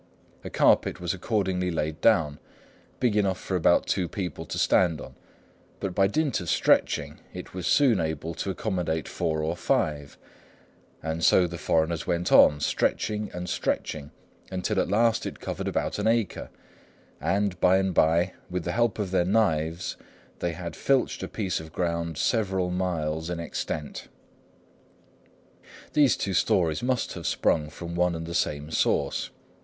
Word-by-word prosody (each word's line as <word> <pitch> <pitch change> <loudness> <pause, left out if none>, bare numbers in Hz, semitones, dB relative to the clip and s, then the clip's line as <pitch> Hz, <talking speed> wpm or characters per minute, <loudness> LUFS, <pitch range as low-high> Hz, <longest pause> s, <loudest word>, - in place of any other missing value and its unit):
A - - -6
carpet - - +3
was 90 0 -1
accordingly 95 -2 -1
laid 80 -2 -2
down, 80 -10 +3 0.6
big 120 -5 +2
enough 100 -3 +1
for 95 - -3
about 85 -1 +3
two 90 -3 0
people 90 -4 -5
to - - -4
stand 85 -5 +3
on; - - -9 0.7
but 95 - -3
by 95 +1 +3
dint 145 +4 0
of 85 - -5
stretching, - - +2 0.2
it - - -8
was 90 -1 -4
soon 130 -9 +4
able 80 +1 -3
to 90 - -4
accommodate 90 -5 -2
four 80 -3 -1
or 80 +2 -1
five; 75 -4 -1 0.9
and 80 +1 -3
so 90 +4 +5
the 85 0 -6
foreigners 80 0 0
went 85 0 0
on, 75 - +7
stretching 105 +8 0
and 90 0 -5
stretching, 75 -4 -2 0.4
until 95 +2 -1
at - - 0
last 115 +3 +2
it - - -7
covered - - -4
about - - -1
an - - 0
acre, 115 -3 0 0.7
and 100 -2 0
by 90 +1 +5
and 95 -1 0
by, 85 +3 +3 0.2
with 90 -1 -3
the - - -2
help 120 -1 +1
of 100 -4 -3
their 95 -2 +3
knives, 90 -4 0 0.4
they 85 -1 -1
had 85 -1 -6
filched 135 -2 +1
a - - -3
piece 95 -5 -2
of 80 0 -10
ground 85 -2 -2
several 95 -5 0
miles 80 -3 -2
in 90 -1 -3
extent." 75 -2 -5 1.9
These 145 -4 +4
two 100 - -2
stories 80 -4 +2
must 125 0 -1
have - - -5
sprung 75 -2 +1
from 85 +2 -7
one 90 0 +1
and 80 0 -5
the 85 - -6
same 75 -3 -1
source. - - 0
90 Hz, 160 wpm, -26 LUFS, 80-95 Hz, 1.9 s, on